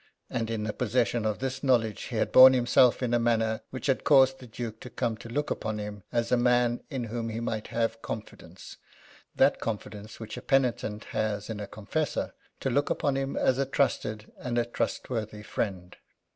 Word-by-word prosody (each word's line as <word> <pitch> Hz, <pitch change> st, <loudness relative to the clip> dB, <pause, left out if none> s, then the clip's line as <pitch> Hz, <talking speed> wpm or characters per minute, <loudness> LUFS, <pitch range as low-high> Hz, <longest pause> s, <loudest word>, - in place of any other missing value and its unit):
And, 115 Hz, -3 st, -2 dB
in 110 Hz, -2 st, -2 dB
the 105 Hz, 0 st, -2 dB
possession 120 Hz, -1 st, 0 dB
of 105 Hz, -, -1 dB
this 130 Hz, 0 st, -3 dB
knowledge, 115 Hz, -6 st, +1 dB
he -, -, -6 dB
had -, -, 0 dB
borne 130 Hz, 0 st, +10 dB
himself 125 Hz, 0 st, +4 dB
in 120 Hz, -1 st, 0 dB
a 120 Hz, -, +4 dB
manner 115 Hz, -1 st, +1 dB
which 130 Hz, -, -7 dB
had 135 Hz, -2 st, +1 dB
caused 135 Hz, -2 st, +5 dB
the 125 Hz, -, -11 dB
Duke 110 Hz, -1 st, -6 dB
to 125 Hz, -, -9 dB
come 120 Hz, -3 st, -1 dB
to 115 Hz, -, -10 dB
look 145 Hz, +5 st, -2 dB
upon 110 Hz, -1 st, -2 dB
him 105 Hz, -1 st, -6 dB
as 120 Hz, -1 st, 0 dB
a 125 Hz, -, +5 dB
man 120 Hz, 0 st, +2 dB
in 135 Hz, -5 st, -3 dB
whom 115 Hz, 0 st, -3 dB
he 110 Hz, +1 st, -4 dB
might 110 Hz, -2 st, -3 dB
have 115 Hz, -1 st, -1 dB
confidence 110 Hz, -1 st, -8 dB, 0.6 s
that -, -, +4 dB
confidence 105 Hz, -1 st, -5 dB
which 110 Hz, -1 st, -7 dB
a -, -, -6 dB
penitent 125 Hz, -5 st, 0 dB
has 105 Hz, 0 st, -1 dB
in 105 Hz, -, -5 dB
a 105 Hz, -, -5 dB
confessor 115 Hz, +9 st, -3 dB, 0.3 s
to 135 Hz, -, 0 dB
look 145 Hz, +4 st, +1 dB
upon 140 Hz, -2 st, 0 dB
him 135 Hz, 0 st, -2 dB
as 130 Hz, 0 st, +2 dB
a 135 Hz, -, +2 dB
trusted 110 Hz, -4 st, -1 dB
and 120 Hz, -1 st, -3 dB
a 120 Hz, -, +2 dB
trustworthy 110 Hz, -2 st, -3 dB
friend. 95 Hz, -4 st, -4 dB
115 Hz, 200 wpm, -28 LUFS, 110-130 Hz, 0.6 s, borne